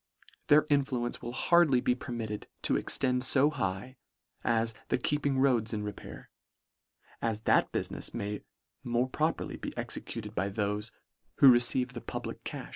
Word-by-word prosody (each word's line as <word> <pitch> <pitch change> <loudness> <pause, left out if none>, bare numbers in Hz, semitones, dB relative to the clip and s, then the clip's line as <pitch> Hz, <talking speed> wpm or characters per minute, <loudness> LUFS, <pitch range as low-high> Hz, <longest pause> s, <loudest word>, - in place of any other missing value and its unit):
Their 150 +1 +6
influence 135 -5 0
will 120 - -5
hardly 155 0 +4
be 125 - +2
permitted 115 -4 -5 0.2
to - - +2
extend 125 -2 +1
fo 140 +3 +5
high 120 -1 -3 0.5
as 115 -1 +1
the - - +1
keep 145 +3 0
ing 135 -1 +1
roads 120 -5 +2
in 105 - -3
repair, 105 0 -8 0.9
as 110 -2 -1
that - - +3
bulinefs - - -3
may 105 +1 -4 0.4
more 120 +1 0
properly 155 +5 -2
be - - -7
executed - - -5
by 95 +3 -1
thofe 105 +1 -2 0.5
who 135 - +8
receive 125 +1 +3
the 120 - -6
public - - -6
cam. - - -6
120 Hz, 150 wpm, -30 LUFS, 110-135 Hz, 0.9 s, who